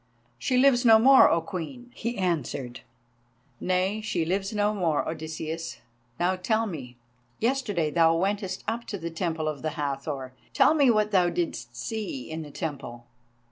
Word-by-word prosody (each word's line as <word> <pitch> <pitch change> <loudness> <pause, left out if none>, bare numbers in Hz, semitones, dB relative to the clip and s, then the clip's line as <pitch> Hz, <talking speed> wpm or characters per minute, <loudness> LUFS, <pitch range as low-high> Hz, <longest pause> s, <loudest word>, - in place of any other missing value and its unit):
"She 255 - +1
lives 255 -1 +5
no 225 -2 +8
more, 265 +4 +7
O 165 - +2
Queen!" 200 +8 -7
he 235 0 -4
answered. 145 -9 -2 0.8
"Nay, 185 +4 0
she 175 -6 -1
lives 195 +3 -1
no 210 -1 +1
more, 170 -7 0
Odysseus. 160 +1 -5 0.4
Now 180 +2 +2
tell 220 +4 0
me; 135 - -7 0.4
yesterday 215 - 0
thou 165 0 +4
wentest 190 +1 -1
up 230 +2 -2
to 205 - -5
the 170 -2 -5
Temple 160 -2 -2
of 155 -2 -3
the 155 0 -4
Hathor; 140 -2 -3 0.2
tell - - +5
me 285 -5 +4
what 215 -2 +2
thou 180 -3 +4
didst 120 -9 -3
see 160 - -4
in 160 +1 -4
the 150 - -8
temple." 135 -6 -6
175 Hz, 160 wpm, -27 LUFS, 155-215 Hz, 0.8 s, no